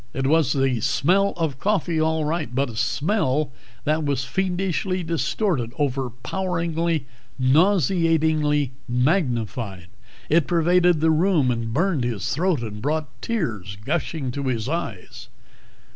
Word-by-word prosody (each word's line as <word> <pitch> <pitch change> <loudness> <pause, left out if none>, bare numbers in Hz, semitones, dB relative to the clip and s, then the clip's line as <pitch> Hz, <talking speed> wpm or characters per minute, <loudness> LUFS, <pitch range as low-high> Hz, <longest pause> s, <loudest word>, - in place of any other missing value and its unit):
It 135 - -1
was 150 -1 +3
the 135 -3 +1
smell 170 - +2
of 155 -6 -2
coffee, 185 -5 +1
all 160 -1 +1
right, 150 -5 -2
but 135 -1 0
a - - -11
smell 145 - 0 0.3
that 155 +1 +1
was 140 -2 -1
fiendishly 185 +3 -1
distorted, 165 - -1
overpoweringly, 160 +5 -1 0.3
nauseatingly 155 -1 +2 0.2
magnified. 120 - -1 0.4
It 155 -2 +3
pervaded 175 0 +3
the 160 0 +4
room 160 -5 +3
and 115 -1 -3
burned 160 +1 +1
his 115 -5 -2
throat 165 -5 +1
and 105 -2 -6
brought 150 +1 -1
tears 110 - -3
gushing 155 -3 -2
to 140 +2 -4
his 115 -3 -1
eyes. 140 - -5
150 Hz, 125 wpm, -23 LUFS, 125-170 Hz, 0.4 s, the